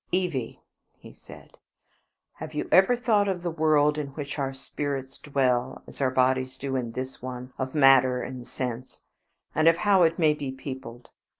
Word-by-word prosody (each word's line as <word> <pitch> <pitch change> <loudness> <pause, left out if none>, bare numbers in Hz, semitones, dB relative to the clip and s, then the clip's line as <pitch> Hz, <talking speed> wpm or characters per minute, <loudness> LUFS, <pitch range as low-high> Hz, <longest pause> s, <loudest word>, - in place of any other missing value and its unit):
"Evie," 170 -10 -2 0.4
he - - -14
said, - - -15 0.7
"have 155 0 -9
you - - -2
ever 190 +6 +6
thought 220 -4 +2
of 180 -3 -2
the 175 - -2
world 155 -2 +2
in 145 - -3
which 145 -1 -5
our 135 -1 -1
spirits 135 0 -5
dwell, 130 -3 0
as - - -10
our 135 - +3
bodies 130 0 +1
do 135 0 -4
in 120 -3 -3
this 130 +2 -6
one 125 0 -7
of 130 +2 -4
matter 135 -3 +5
and 125 -1 -7
sense, 125 0 -5 0.5
and 155 +1 +2
of 165 0 +6
how 200 0 +3
it 165 -1 +3
may 155 -3 +4
be 145 -3 -5
peopled? 130 -3 -9
135 Hz, 175 wpm, -26 LUFS, 130-155 Hz, 0.7 s, ever